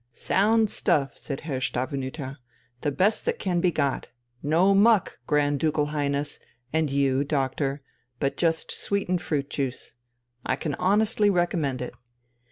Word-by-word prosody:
"Sound 215 Hz, -, +2 dB
stuff!" 135 Hz, -4 st, +1 dB
said 140 Hz, -2 st, -6 dB
Herr 145 Hz, -5 st, -3 dB
Stavenüter. 135 Hz, +1 st, -3 dB, 0.4 s
"The 145 Hz, -, 0 dB
best 195 Hz, +9 st, +2 dB
that 475 Hz, 0 st, 0 dB
can 180 Hz, -, 0 dB
be 180 Hz, -, +4 dB
got. 140 Hz, -4 st, -1 dB, 0.3 s
No 170 Hz, +7 st, +3 dB
muck, 205 Hz, 0 st, +4 dB
Grand 145 Hz, -1 st, +2 dB
Ducal 155 Hz, -1 st, +1 dB
Highness, 145 Hz, 0 st, -1 dB, 0.3 s
and 160 Hz, -2 st, +2 dB
you, 135 Hz, -1 st, +2 dB
doctor, 140 Hz, 0 st, -1 dB, 0.4 s
but 140 Hz, -, 0 dB
just 165 Hz, -1 st, 0 dB
sweetened 185 Hz, -3 st, -1 dB
fruit 145 Hz, -5 st, -1 dB
juice. 135 Hz, -5 st, -3 dB, 0.5 s
I -, -, 0 dB
can 145 Hz, +2 st, -3 dB
honestly 210 Hz, +4 st, +3 dB
recommend 165 Hz, -8 st, 0 dB
it!" 125 Hz, -, -6 dB
150 Hz, 140 wpm, -26 LUFS, 140-185 Hz, 0.5 s, be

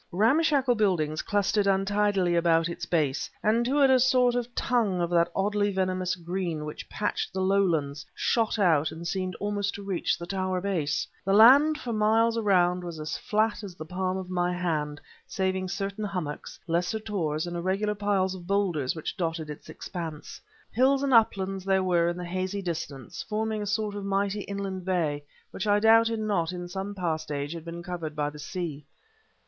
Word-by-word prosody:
Ramshackle 265 Hz, -, +3 dB
buildings 175 Hz, -9 st, +1 dB
clustered 205 Hz, 0 st, +1 dB
untidily 195 Hz, -2 st, +2 dB
about 165 Hz, -1 st, +3 dB
its 170 Hz, -, -5 dB
base, 150 Hz, -5 st, 0 dB
and 225 Hz, +3 st, +3 dB
to 280 Hz, +3 st, +3 dB
it 270 Hz, -, +6 dB
a 260 Hz, -, +5 dB
sort 250 Hz, -1 st, +4 dB
of 245 Hz, 0 st, -3 dB
tongue 220 Hz, -7 st, +1 dB
of 170 Hz, 0 st, -1 dB
that 170 Hz, 0 st, +3 dB
oddly 205 Hz, +1 st, +1 dB
venomous 185 Hz, -1 st, 0 dB
green 170 Hz, -3 st, -3 dB
which 150 Hz, -, -8 dB
patched 210 Hz, -, -2 dB
the 190 Hz, -, -4 dB
lowlands, 175 Hz, -7 st, +1 dB
shot 225 Hz, -2 st, +1 dB
out 160 Hz, -7 st, +3 dB
and 165 Hz, +2 st, -6 dB
seemed 185 Hz, 0 st, -2 dB
almost 205 Hz, -1 st, -2 dB
to 200 Hz, -, -7 dB
reach 195 Hz, -3 st, -1 dB
the 170 Hz, -, -7 dB
towerbase. 185 Hz, -4 st, -1 dB, 0.2 s
The 195 Hz, -, +1 dB
land 280 Hz, +8 st, +7 dB
for 245 Hz, -6 st, -4 dB
miles 225 Hz, +2 st, +3 dB
around 180 Hz, -5 st, +2 dB
was 170 Hz, -2 st, -6 dB
as 155 Hz, 0 st, -4 dB
flat 215 Hz, +1 st, 0 dB
as 190 Hz, -3 st, -8 dB
the 155 Hz, -, -8 dB
palm 185 Hz, +2 st, -2 dB
of 190 Hz, -1 st, -5 dB
my 180 Hz, -1 st, 0 dB
hand, 155 Hz, -5 st, -2 dB, 0.3 s
saving 190 Hz, -1 st, -1 dB
certain 195 Hz, +2 st, -4 dB
hummocks, 180 Hz, -7 st, -5 dB
lesser 175 Hz, +5 st, 0 dB
tors, 165 Hz, -8 st, -2 dB
and 175 Hz, 0 st, -5 dB
irregular 190 Hz, +4 st, 0 dB
piles 200 Hz, -2 st, 0 dB
of 175 Hz, -2 st, -9 dB
boulders 180 Hz, -9 st, 0 dB
which 160 Hz, -, -5 dB
dotted 165 Hz, -3 st, -3 dB
its 150 Hz, -, -11 dB
expanse. 165 Hz, -5 st, -7 dB, 0.3 s
Hills 265 Hz, +4 st, +3 dB
and 275 Hz, -2 st, +1 dB
uplands 195 Hz, -4 st, +3 dB
there 190 Hz, 0 st, +2 dB
were 175 Hz, -2 st, +2 dB
in 175 Hz, 0 st, -1 dB
the 180 Hz, -, -5 dB
hazy 185 Hz, +3 st, -3 dB
distance, 155 Hz, -7 st, -5 dB
forming 215 Hz, 0 st, -2 dB
a 205 Hz, -, -4 dB
sort 210 Hz, 0 st, -1 dB
of 205 Hz, -1 st, -5 dB
mighty 200 Hz, +1 st, 0 dB
inland 195 Hz, -2 st, -4 dB
bay 165 Hz, -6 st, -1 dB, 0.3 s
which 210 Hz, -, -4 dB
I 205 Hz, 0 st, +4 dB
doubted 225 Hz, +1 st, +5 dB
not 190 Hz, -6 st, 0 dB
in 175 Hz, 0 st, -5 dB
some 195 Hz, +3 st, -5 dB
past 160 Hz, -4 st, -2 dB
age 145 Hz, +1 st, -3 dB
had 165 Hz, -1 st, -8 dB
been 170 Hz, 0 st, -7 dB
covered 170 Hz, -4 st, -5 dB
by 150 Hz, -1 st, -1 dB
the 150 Hz, -, -11 dB
sea. 160 Hz, -3 st, -5 dB
190 Hz, 185 wpm, -27 LUFS, 170-205 Hz, 0.3 s, land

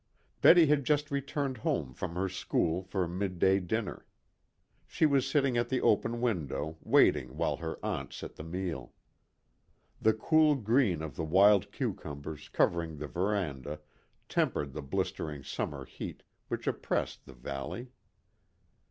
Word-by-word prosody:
Betty 170 Hz, -1 st, +8 dB
had 150 Hz, -1 st, +3 dB
just 145 Hz, +2 st, +1 dB
returned 140 Hz, -1 st, -2 dB
home 125 Hz, -, -1 dB
from 85 Hz, +5 st, -5 dB
her 95 Hz, +2 st, 0 dB
school 90 Hz, -1 st, 0 dB
for 95 Hz, -1 st, -2 dB
midday 95 Hz, +1 st, +1 dB
dinner. 100 Hz, +3 st, -3 dB, 0.8 s
She -, -, +2 dB
was 140 Hz, -3 st, +3 dB
sitting 135 Hz, -4 st, +2 dB
at 120 Hz, -, 0 dB
the 130 Hz, -, +1 dB
open 115 Hz, +2 st, +2 dB
window, 80 Hz, -, -2 dB
waiting 65 Hz, 0 st, +3 dB
while -, -, 0 dB
her -, -, -5 dB
aunt -, -, -3 dB
set -, -, -8 dB
the -, -, -8 dB
meal. 80 Hz, -6 st, -4 dB, 1.1 s
The 110 Hz, -, +5 dB
cool 155 Hz, +6 st, +4 dB
green 110 Hz, -, +2 dB
of 80 Hz, -, -6 dB
the 80 Hz, -, -3 dB
wild 95 Hz, +5 st, +5 dB
cucumbers 75 Hz, +1 st, -5 dB
covering 85 Hz, -2 st, +1 dB
the 75 Hz, -, -5 dB
veranda 80 Hz, -6 st, -2 dB, 0.5 s
tempered 70 Hz, -3 st, 0 dB
the 75 Hz, -, -5 dB
blistering 70 Hz, +1 st, -3 dB
summer 70 Hz, -2 st, -4 dB
heat -, -, -8 dB, 0.2 s
which -, -, -4 dB
oppressed -, -, -2 dB
the 65 Hz, -, -11 dB
valley. 70 Hz, -, -6 dB
95 Hz, 140 wpm, -31 LUFS, 75-125 Hz, 1.1 s, Betty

